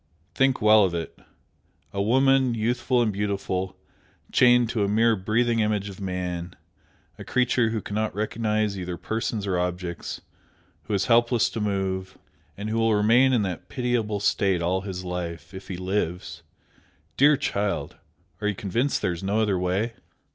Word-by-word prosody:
Think 135 -4 +2
well 110 0 +7
of 90 -3 0
it! 85 -1 -5 0.8
a 100 - -1
woman, 130 +3 +3
youthful 120 +2 +1
and 110 -3 0
beautiful, 95 -2 -2 0.5
chained 120 -2 +5
to 110 -4 0
a - - +1
mere 110 +2 +3
breathing 115 +4 +1
image 105 -2 0
of 100 0 -10
man, 90 -2 -4 0.6
a - - -6
creature 125 -2 +1
who 110 -1 -2
cannot 105 0 -2
recognise 110 -1 -1
either 90 -1 -4
persons 110 0 -3
or 95 -3 0
objects, 90 0 -4 0.7
who 105 - -1
is 95 0 0
helpless 120 -2 +3
to 115 - -4
move, 95 -2 -2 0.4
and 100 +1 -5
who 115 - 0
will 115 -1 +3
remain 115 +6 +4
in 120 -5 +2
that 90 -3 -5
pitiable 120 -5 -1
state 95 -2 +1
all 90 +2 0
his 95 -2 -6
life, 85 -2 -5
if 95 +1 -9
he 90 - -5
lives! 90 -4 -3 0.7
dear 145 +1 +5
child, 100 -4 -2 0.4
are 105 - 0
you 105 - 0
convinced 115 +9 -1
there 90 - +1
is 85 - -7
no 100 +3 0
other 105 -4 +1
way?" 95 +6 -1
105 Hz, 160 wpm, -25 LUFS, 95-115 Hz, 0.8 s, well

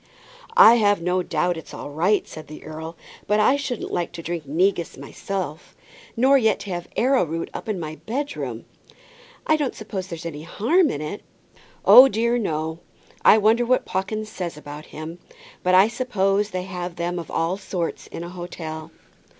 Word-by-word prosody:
"I've 215 - +7
no 180 +2 0
doubt 175 0 0
it's 160 - -9
all 145 - -7
right," 180 +8 +1
said 155 - -10
the 155 - -10
earl; 160 +1 -7 0.3
"but 210 +1 +3
I 235 +6 +5
shouldn't 275 -5 -4
like 175 -1 -1
to 170 -1 -7
drink 165 -3 -4
negus 170 +3 0
myself, 175 +4 -6 0.4
nor 270 +3 +5
yet 220 -3 +2
to 200 - -6
have 175 -1 -4
arrowroot 200 - +1
up - - -6
in 205 -4 -1
my 155 -1 -6
bedroom." 280 +6 -4 0.8
"I 310 - +3
don't 290 -4 -2
suppose 200 -4 -5
there's 170 -2 -7
any 150 -3 -5
harm 280 - +2
in 145 - -3
it." 155 +7 -5 0.6
"Oh 260 +2 +10
dear, 235 0 +1
no; 160 -5 -2 0.4
I - - +8
wonder 220 +3 +4
what 255 +1 +2
Pawkins 215 +3 -3
says 175 -6 -5
about 150 0 -9
him. 160 +3 -8 0.4
But 185 0 +3
I 190 +3 +7
suppose 210 -4 0
they 185 -2 -3
have 180 -2 -5
them 175 +1 -2
of 165 - -8
all 165 +3 0
sorts 180 -4 -4
in 170 - -7
an 175 - -7
hotel." 165 -3 -7
180 Hz, 175 wpm, -23 LUFS, 165-215 Hz, 0.8 s, Oh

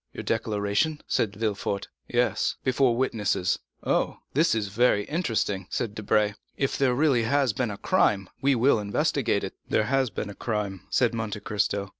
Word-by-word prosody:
"Your - - -6
declaration?" 110 +7 0
said 105 -3 0
Villefort. 105 -2 -2 0.2
"Yes, 120 -1 +1
before 130 -2 +2
witnesses." 105 -8 0 0.2
"Oh, - - 0 0.2
this 155 -2 +3
is 105 -3 -1
very 105 0 +3
interesting," 110 - -1
said 115 -4 -2
Debray; 105 -1 +1 0.2
"if 135 - 0
there 130 -3 +2
really 140 -3 +3
has 130 +1 +2
been 120 0 -1
a 100 - -5
crime, 100 -1 +2
we 140 0 +3
will 120 0 +4
investigate 100 -1 0
it." - - -4 0.2
"There 110 - +3
has 135 +2 +1
been 105 +1 -4
a - - -8
crime," 100 -4 -3
said 120 -2 +2
Monte 110 -2 -3
Cristo. 100 -1 -1
110 Hz, 165 wpm, -26 LUFS, 105-130 Hz, 0.2 s, will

